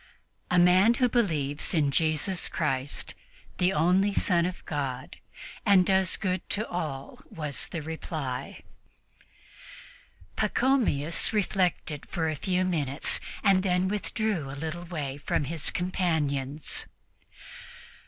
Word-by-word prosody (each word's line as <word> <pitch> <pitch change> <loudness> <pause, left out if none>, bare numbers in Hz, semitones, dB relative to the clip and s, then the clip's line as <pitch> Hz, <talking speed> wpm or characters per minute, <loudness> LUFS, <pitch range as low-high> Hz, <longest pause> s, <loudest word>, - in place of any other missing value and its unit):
"A 180 - +2
man 185 +6 +6
who 250 +1 +3
believes 160 - 0
in 145 -3 +3
Jesus 160 +4 0
Christ, 135 -3 -2 0.5
the 180 +1 +3
only 185 +5 +3
Son 175 -2 +2
of 180 - -7
God, 135 -5 -4 0.5
and 190 -2 +5
does 190 -1 +3
good 185 -3 -1
to 215 +2 -1
all," 150 -6 -5
was 150 -3 -3
the 160 - -5
reply. 150 -5 -5 1.7
Pachomius 220 - +2
reflected 180 -7 0
for 160 -3 -1
a - - -3
few 185 +4 0
minutes 150 -6 0 0.2
and 195 -3 +5
then 185 -1 +1
withdrew 205 -5 -1
a 135 - -7
little 160 +3 -4
way 145 -6 -4
from 145 - 0
his 160 +2 +1
companions. 155 -6 -1
170 Hz, 115 wpm, -28 LUFS, 145-185 Hz, 1.7 s, man